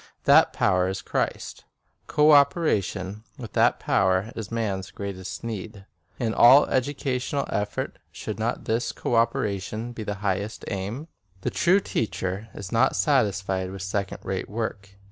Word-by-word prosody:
That - - +6
power 90 0 +2
is 95 0 -4
Christ. - - -3 0.4
Co 150 +1 +4
operation 110 - +2
with 120 -6 -9
that - - +3
power 95 +3 +1
is 110 -3 -5
man's 100 -5 -2
greatest 100 0 -6
need. 105 -3 -6 0.3
In 115 -2 -1
all 130 +6 +8
educational 135 0 -1
effort 105 0 -3
should 110 0 -6
not 115 +2 -2
this 115 +2 0
co - - -4
operation 115 -1 0
be 120 - -7
the 105 -1 -3
highest 100 +3 -2
aim? 105 +10 -4 0.3
The - - -2
true 185 +3 +4
teacher 95 - -3
is 100 -1 -7
not 125 +3 +3
satisfied 95 - +1
with 95 0 -7
second 95 0 -2
rate 95 -1 -3
work. 100 -3 -5
105 Hz, 145 wpm, -25 LUFS, 95-120 Hz, 0.4 s, all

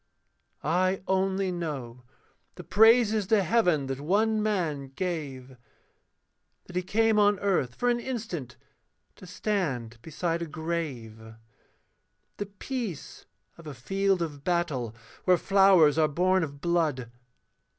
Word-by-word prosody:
I 185 +5 +1
only 190 0 0
know 140 -9 -5 0.5
the - - -9
praises 220 -1 +4
to 215 -2 +3
heaven 175 -7 +2
that 135 0 -4
one 215 +7 +1
man 170 -10 -1
gave, 140 -8 -5 1.1
That 180 - -13
he 180 - +1
came 220 +3 +2
on 205 0 +4
earth 180 -11 0
for 245 - -1
an 240 0 +2
instant, 220 - -5 0.6
to 185 - -13
stand 135 - -3
beside 165 +4 -3
a 170 - -3
grave, 135 -9 -5 1.0
The 205 - -4
peace 205 - -6 0.3
of 165 - -12
a 145 - -7
field 195 +7 0
of 145 -4 -7
battle, 150 -11 -1 0.3
where 180 -1 +5
flowers 190 -6 +5
are 155 - +4
born 185 +5 +2
of 140 -2 -7
blood. 155 -9 0
175 Hz, 125 wpm, -27 LUFS, 145-195 Hz, 1.1 s, where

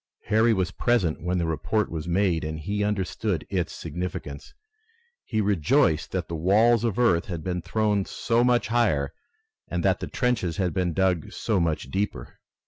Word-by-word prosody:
Harry 110 +2 +4
was 95 -4 0
present 95 -8 +1
when 90 +2 -1
the 85 - 0
report 80 +7 -1
was 80 0 -4
made 90 -2 +1
and 80 0 -4
he 105 +5 -1
understood 100 -3 -1
its 90 -4 -1
significance. 85 -5 -6 0.7
He 110 -2 0
rejoiced 100 - +2
that 95 -2 -2
the - - -6
walls 105 +8 +3
of 115 -5 0
earth 115 -9 +3
had 85 -5 -5
been 90 0 -2
thrown 105 +2 0
so 115 0 0
much 120 -2 +2
higher 100 -13 +1 0.5
and - - -2
that - - +3
the - - -4
trenches 110 -9 -1
had 90 -4 0
been 90 -3 0
dug 90 -2 0
so 110 -4 -1
much 80 -2 -1
deeper. 95 -11 -3
95 Hz, 170 wpm, -25 LUFS, 85-110 Hz, 0.7 s, Harry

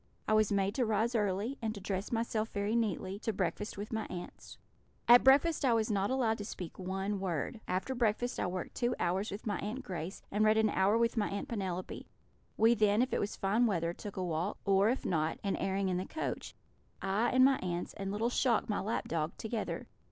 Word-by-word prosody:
I - - +2
was 215 -1 +4
made 200 0 +1
to 255 - +1
rise 220 +3 +1
early, 210 +4 0
and 220 -1 -2
to - - -6
dress 195 0 -3
myself 225 -1 -1
very 205 +2 -1
neatly, 205 -4 -1
to 225 - -1
breakfast 195 +2 -2
with 205 +3 -6
my 220 - -1
aunts. 175 -1 -8 0.5
At 240 +1 +9
breakfast 285 +5 +5
I 255 -3 +4
was 220 0 +1
not 200 -1 +1
allowed 235 -4 +1
to - - -3
speak 185 -5 -7
one 190 +2 -2
word. 185 +3 -2
After 185 +8 -1
breakfast 240 0 0
I - - 0
worked 180 0 -4
two 240 0 0
hours 185 +4 0
with 200 +3 -7
my 205 -4 -1
Aunt 230 +6 -4
Grace, 185 -4 -6
and 210 +2 +2
read 215 0 +4
an 220 -1 +3
hour 195 +4 +3
with 235 +1 +1
my 210 - +1
Aunt 200 - -4
Penelope; 185 -5 -4 0.5
we 225 +2 +6
then, 210 0 +3
if 255 - -3
it - - +2
was 205 - -2
fine 215 +5 +2
weather, 170 -5 0
took 200 +2 -8
a 185 - -1
walk, 175 +4 -2
or, 200 +1 +4
if 255 - -1
not, 160 -2 0
an 200 - 0
airing 195 0 0
in 180 -1 0
the 185 - -3
coach 315 - -4 0.5
I, 200 +5 +1
and 255 0 +6
my 270 0 +4
aunts, 175 -1 -3
and 195 -1 -4
little 225 +4 0
Shock, 245 -3 +2
the 210 - -1
lap 215 +4 -2
dog, 160 -1 -2
together. 220 0 -3
205 Hz, 220 wpm, -32 LUFS, 190-225 Hz, 0.5 s, At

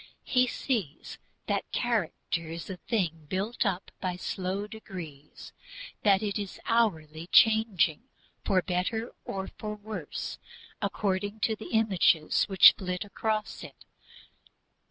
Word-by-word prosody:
He 255 -1 +3
sees 230 - -3 0.3
that - - -2
character 170 -1 -1
is 165 +3 -6
a 185 - -6
thing 165 -8 -2
built 205 +5 -1
up 185 -1 -3
by 185 -2 -1
slow 185 +2 -3
degrees, 180 -9 -10 0.5
that 200 -1 +4
it 205 -1 -1
is 200 -2 -6
hourly 165 -9 0
changing 210 -8 +4 0.4
for 185 -2 +2
better 190 +6 -1
or 190 -1 -4
for 210 -1 -4
worse 205 -7 -6 0.4
according 205 +1 -1
to 220 - +2
the 215 - -9
images 190 -8 +3
which 190 -2 +8
flit 180 +1 -4
across 215 +1 -2
it. - - -12
195 Hz, 120 wpm, -29 LUFS, 180-215 Hz, 0.5 s, which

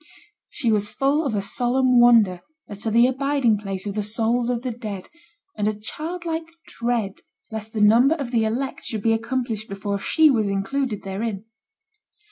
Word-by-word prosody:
She 235 - -1
was 210 -1 +1
full 280 +6 +1
of 225 - -2
a 200 - -1
solemn 250 +3 +2
wonder 225 -7 +5 0.3
as 205 - -9
to 225 - -1
the 230 +2 +5
abiding 260 -4 +1
place 195 -2 -5
of 200 - -3
the 210 - -1
souls 230 +3 0
of 245 -1 -1
the 255 - -2
dead, 215 -5 -7 0.5
and 210 0 -1
a 215 -1 -2
childlike 325 +6 -4 0.2
dread 230 -4 -2 0.3
lest 220 0 -5
the 215 - -1
number 235 +8 +5
of 275 -7 -5
the 230 -3 +2
elect 245 +5 -2
should 220 -4 -4
be 225 - +3
accomplished 230 -1 -2
before 200 0 -3
she 310 +8 +4
was 220 -5 +1
included 210 +3 -2
therein. 195 +1 -4
225 Hz, 175 wpm, -23 LUFS, 210-255 Hz, 0.5 s, wonder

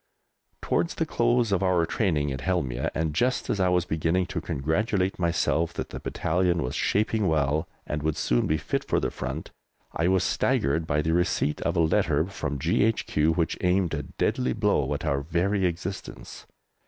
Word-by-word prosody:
Towards 170 - 0
the 165 - 0
close 120 -5 +1
of 100 - +2
our 90 -3 +2
training 80 -7 0
at 65 - -4
Helmieh, 70 -10 -1
and 80 -1 -1
just 125 +10 0
as 100 - -1
I 90 -1 +3
was 90 -1 +2
beginning 80 +3 0
to 85 - -2
congratulate 90 +6 -1
myself 85 -1 +1
that - - -4
the - - -6
battalion 90 0 0
was 65 - -3
shaping 110 0 +1
well 75 0 +1 0.2
and 75 0 -3
would 80 0 -1
soon - - +1
be 80 - +1
fit - - -2
for - - 0
the - - -2
front, 65 +5 -5 0.4
I 85 - 0
was 95 0 +3
staggered 75 +4 +1
by 75 +1 +1
the 80 - +1
receipt 85 -3 0
of - - -1
a - - +4
letter 80 -2 +2
from 75 -7 -4
G.H.Q. 80 -2 +1
which 85 -1 -1
aimed 90 -1 +2
a 75 - -1
deadly 65 -3 -1
blow 70 +2 +1
at 70 - -5
our 70 -2 0
very 90 +5 +1
existence. 90 +3 -6
85 Hz, 180 wpm, -26 LUFS, 75-95 Hz, 0.4 s, a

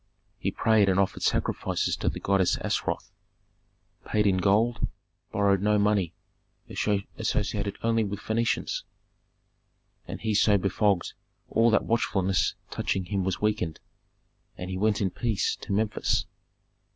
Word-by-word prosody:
He - - 0
prayed 110 -3 +3
and 95 0 +2
offered 100 - 0
sacrifices - - 0
to - - 0
the - - -5
goddess 95 -2 +2
Astaroth, - - -2 0.9
paid 105 -1 +1
in 95 -2 +3
gold, 105 +4 +2 0.4
borrowed 100 -1 +2
no 105 +1 +3
money, 100 -4 +2 0.6
associated 100 0 -1
only 115 0 +2
with 100 -1 -4
Phœnicians. 115 +1 -1 1.3
And - - -6
he 110 -1 -1
so 105 0 +4
befogged 100 0 +1 0.4
all 115 +1 +4
that 110 - +3
watchfulness 95 -5 +1 0.2
touching 95 -1 -1
him 95 0 -1
was 95 -1 -2
weakened, 105 -7 0 0.8
and 90 +1 -5
he - - -3
went 105 0 +2
in 95 -2 +1
peace 115 -5 0
to - - -8
Memphis. 105 +1 +1
100 Hz, 130 wpm, -27 LUFS, 95-110 Hz, 1.3 s, so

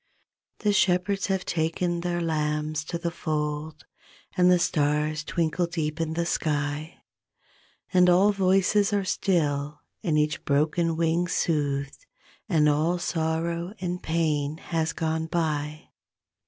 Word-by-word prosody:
The 210 -1 +2
Shepherds 190 +1 +2
have 190 -2 -1
taken 170 +1 -1
their 175 0 -1
lambs 150 -1 -1
to 170 - -3
the 170 0 -3
fold 150 -1 -3 0.5
And 180 -1 +5
the 180 - +6
stars 150 -2 0
twinkle 170 +1 0
deep 160 -1 -3
in 160 0 -2
the 170 0 0
sky, 150 -1 -2 0.9
And 180 -1 +6
all 190 +4 +5
voices 195 +1 +2
are 200 -2 +1
still 150 -6 0 0.2
and 160 -6 +1
each 150 +2 0
broken 160 +3 +1
wing 170 +1 +1
soothed, 145 - -1 0.4
And 155 -5 +4
all 155 +4 +2
sorrow 170 +2 -2
and 180 0 -3
pain 155 -2 0
has 165 -1 -2
gone 160 0 -2
by. 155 -2 -2
165 Hz, 125 wpm, -26 LUFS, 150-175 Hz, 0.9 s, the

